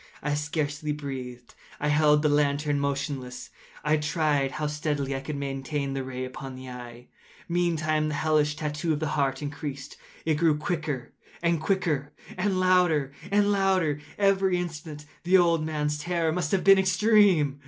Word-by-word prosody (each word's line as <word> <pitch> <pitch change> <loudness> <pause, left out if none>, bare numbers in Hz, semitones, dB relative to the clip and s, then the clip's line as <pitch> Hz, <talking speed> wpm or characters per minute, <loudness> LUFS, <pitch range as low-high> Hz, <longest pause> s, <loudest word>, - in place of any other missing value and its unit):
I 150 0 0
scarcely 150 0 -2
breathed. 130 -4 -7 0.3
I 150 - 0
held 150 0 +4
the - - +4
lantern 145 0 +1
motionless. 135 -3 -3 0.3
I 150 +1 +3
tried 150 -3 0
how 150 - -3
steadily 150 -2 -2
I - - -2
could 145 +2 -5
maintain 140 0 -3
the 135 -1 -2
ray 130 0 -5
upon 130 +1 -8
the 130 0 -9
eve. 125 -1 -9 0.4
Meantime 155 -3 +1
the 150 - -2
hellish 150 -1 +2
tattoo 155 +1 -2
of 150 - -2
the 155 -1 -2
heart 135 -1 0
increased. 145 -2 -6 0.3
It 160 -2 +2
grew 160 -3 +3
quicker 150 -4 -3 0.3
and 170 -2 +2
quicker, 155 -5 0 0.2
and 195 -3 0
louder 175 -7 +3 0.2
and 205 0 +3
louder 190 -7 +2 0.2
every 195 -2 +3
instant. 155 -3 -6 0.2
The 180 +2 +5
old 170 -3 +3
man’s 150 -1 -1
terror 170 0 0
must 170 -2 -2
have 195 - +1
been 195 0 +7
extreme! 190 -7 +3
150 Hz, 160 wpm, -27 LUFS, 140-170 Hz, 0.4 s, been